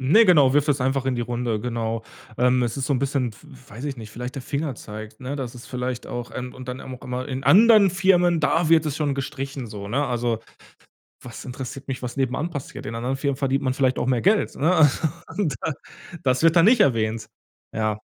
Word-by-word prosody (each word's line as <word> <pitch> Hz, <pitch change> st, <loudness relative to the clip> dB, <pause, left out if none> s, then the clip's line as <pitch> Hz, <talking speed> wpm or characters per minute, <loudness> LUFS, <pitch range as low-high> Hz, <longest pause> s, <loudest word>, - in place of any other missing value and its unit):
Ne, 160 Hz, -, +6 dB
genau, 150 Hz, -9 st, +6 dB
wirft 145 Hz, +1 st, +3 dB
es 140 Hz, -2 st, +2 dB
einfach 135 Hz, +1 st, 0 dB
in 130 Hz, -2 st, 0 dB
die -, -, -1 dB
Runde, 120 Hz, -2 st, -2 dB
genau, 115 Hz, -1 st, -2 dB, 0.3 s
ähm, 125 Hz, 0 st, +3 dB
es 120 Hz, -2 st, -1 dB
ist 135 Hz, -1 st, -2 dB
so -, -, +1 dB
'n 130 Hz, -, 0 dB
bisschen, 135 Hz, -3 st, 0 dB
w -, -, -18 dB, 0.3 s
weiß 115 Hz, +6 st, -8 dB
ich 140 Hz, -3 st, -3 dB
nicht, 110 Hz, -2 st, -9 dB
vielleicht 125 Hz, +4 st, -6 dB
der 135 Hz, -, -4 dB
Fingerzeig, 115 Hz, -7 st, -5 dB
ne, 130 Hz, +2 st, -4 dB
dass 130 Hz, -3 st, -5 dB
es 120 Hz, -, -11 dB
vielleicht 125 Hz, -1 st, -4 dB
auch, 120 Hz, 0 st, -5 dB
ähm 125 Hz, 0 st, -6 dB
und 130 Hz, 0 st, -10 dB
dann 125 Hz, +1 st, -5 dB
auch 130 Hz, -1 st, -9 dB
immer: 125 Hz, +1 st, -4 dB
„In 130 Hz, -1 st, -4 dB
anderen 200 Hz, -, +7 dB
Firmen, 180 Hz, -2 st, +3 dB
da 160 Hz, +2 st, +2 dB
wird 160 Hz, -1 st, +5 dB
es 150 Hz, -1 st, -2 dB
schon 145 Hz, -3 st, 0 dB
gestrichen“ 135 Hz, -1 st, -4 dB
so, 100 Hz, -2 st, -7 dB
ne? 140 Hz, +6 st, 0 dB
Also, 120 Hz, -2 st, -1 dB, 0.8 s
was 120 Hz, -2 st, -9 dB
interessiert 135 Hz, +1 st, -7 dB
mich, 130 Hz, -1 st, -3 dB
was 125 Hz, +1 st, -5 dB
nebenan 135 Hz, +5 st, -1 dB
passiert? 145 Hz, -6 st, -7 dB
In 110 Hz, -, -5 dB
anderen 125 Hz, +3 st, -2 dB
Firmen 140 Hz, 0 st, -1 dB
verdient 135 Hz, 0 st, 0 dB
man 130 Hz, -1 st, +1 dB
vielleicht 130 Hz, -1 st, +1 dB
auch -, -, -1 dB
mehr 130 Hz, -2 st, +2 dB
Geld, 205 Hz, +3 st, +2 dB
ne? 160 Hz, +6 st, +2 dB
Also, 155 Hz, 0 st, +4 dB, 0.3 s
und 170 Hz, -10 st, 0 dB
das 160 Hz, -, -1 dB, 0.5 s
das 130 Hz, 0 st, +2 dB
wird 165 Hz, -1 st, +6 dB
dann 170 Hz, +2 st, +6 dB
nicht 235 Hz, +1 st, +5 dB
erwähnt. 110 Hz, -, +2 dB, 0.5 s
Ja. 110 Hz, -1 st, -1 dB
130 Hz, 225 wpm, -23 LUFS, 120-145 Hz, 0.8 s, anderen